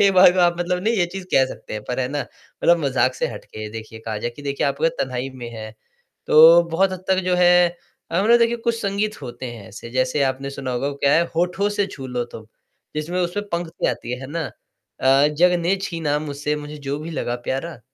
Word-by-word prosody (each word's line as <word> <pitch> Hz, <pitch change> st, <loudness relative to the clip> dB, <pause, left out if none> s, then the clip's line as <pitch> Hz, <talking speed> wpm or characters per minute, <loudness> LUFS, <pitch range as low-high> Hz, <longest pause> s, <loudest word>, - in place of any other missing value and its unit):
एक 200 Hz, -1 st, +5 dB
बार 180 Hz, -1 st, +8 dB
को 185 Hz, -, -2 dB
आप 175 Hz, 0 st, +3 dB
मतलब 180 Hz, +1 st, -1 dB
नहीं 225 Hz, +3 st, +2 dB
ये 180 Hz, -5 st, +2 dB
चीज़ 195 Hz, -1 st, -6 dB
कह 135 Hz, -, +6 dB
सकते -, -, -10 dB
हैं 105 Hz, -, -5 dB
पर 125 Hz, +1 st, -1 dB
है 125 Hz, -, -1 dB
ना, 145 Hz, +1 st, -2 dB
मतलब 170 Hz, 0 st, 0 dB
मजाक 130 Hz, -1 st, +2 dB
से -, -, -1 dB
हटके 110 Hz, +1 st, -8 dB
देखिए 110 Hz, 0 st, -8 dB
कहा 110 Hz, -1 st, -5 dB
जाए 120 Hz, -, -3 dB
कि 145 Hz, +5 st, -13 dB
देखिए 140 Hz, 0 st, -1 dB
आप 140 Hz, 0 st, -2 dB, 0.2 s
तन्हाई 130 Hz, 0 st, -2 dB
में 125 Hz, -3 st, -8 dB
है, 110 Hz, 0 st, -7 dB, 0.6 s
तो 165 Hz, +3 st, +8 dB
बहुत 190 Hz, +3 st, +2 dB
हद 185 Hz, 0 st, -7 dB
तक 190 Hz, -1 st, +3 dB
जो 180 Hz, 0 st, +2 dB
है 180 Hz, 0 st, +6 dB, 0.4 s
अ, 170 Hz, +3 st, +1 dB
मतलब 235 Hz, +3 st, +5 dB
देखिए 235 Hz, 0 st, +2 dB
कुछ 235 Hz, 0 st, -1 dB
संगीत 205 Hz, 0 st, -2 dB
होते 120 Hz, 0 st, -7 dB
हैं 110 Hz, -4 st, -11 dB
ऐसे, 115 Hz, +2 st, -10 dB
जैसे 130 Hz, +3 st, +1 dB
आपने 135 Hz, 0 st, -1 dB
सुना 140 Hz, -2 st, -5 dB
होगा 135 Hz, +3 st, -1 dB
क्या 140 Hz, 0 st, +2 dB
है 165 Hz, -, +5 dB
"होठों 180 Hz, +4 st, +1 dB
से 205 Hz, -, +3 dB
छू 135 Hz, -2 st, -7 dB
लो 125 Hz, -1 st, -2 dB
तुम" 110 Hz, -, -9 dB, 0.5 s
जिसमें 170 Hz, +4 st, -2 dB
उसमें 200 Hz, +4 st, -2 dB
पंक्ति 170 Hz, 0 st, -2 dB
आती 120 Hz, -, -3 dB
है, 125 Hz, -, -4 dB
है 130 Hz, -, -7 dB
ना? 165 Hz, +1 st, -2 dB, 0.6 s
अ, 135 Hz, +2 st, +5 dB
"जग 170 Hz, +4 st, +3 dB
ने 180 Hz, +4 st, +1 dB
छीना 160 Hz, -5 st, -1 dB
मुझसे 150 Hz, 0 st, -3 dB
मुझे 150 Hz, 0 st, -7 dB
जो 140 Hz, +1 st, -1 dB
भी 160 Hz, +2 st, -7 dB
लगा 120 Hz, -6 st, -2 dB
प्यारा।" 135 Hz, +1 st, -3 dB
150 Hz, 230 wpm, -22 LUFS, 130-180 Hz, 0.6 s, बार